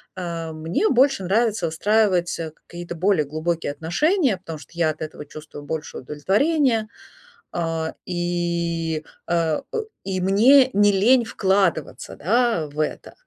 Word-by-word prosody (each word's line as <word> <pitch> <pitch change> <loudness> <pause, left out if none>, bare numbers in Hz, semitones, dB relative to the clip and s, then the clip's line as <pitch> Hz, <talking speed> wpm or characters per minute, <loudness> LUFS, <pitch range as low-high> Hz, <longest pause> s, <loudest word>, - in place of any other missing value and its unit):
Э, 170 -3 -4
мне 160 - 0
больше 265 -5 +3
нравится 210 -1 +1
выстраивать, 185 +1 +1
э, 160 -1 -4 0.2
какие-то 175 0 -7
более 180 -3 +2
глубокие 155 +1 -2
отношения, 220 - +1
потому 165 -4 -8
что - - -15
я 170 -2 +1
от 155 - -5
этого 155 -1 -6
чувствую 150 0 -10
больше 155 +1 -5
удовлетворения, 220 - +1 0.6
а, 165 -1 -2
и, 170 -2 -2 0.2
э 165 -3 +1
э, 455 - -1 0.2
и 190 -1 -2
мне 250 +8 +6
не 205 +1 +5
лень 235 +6 +4
вкладываться, 190 -7 0
да, 225 -5 +1
в 145 +1 -10
это. 155 - -3
175 Hz, 135 wpm, -22 LUFS, 160-210 Hz, 0.6 s, мне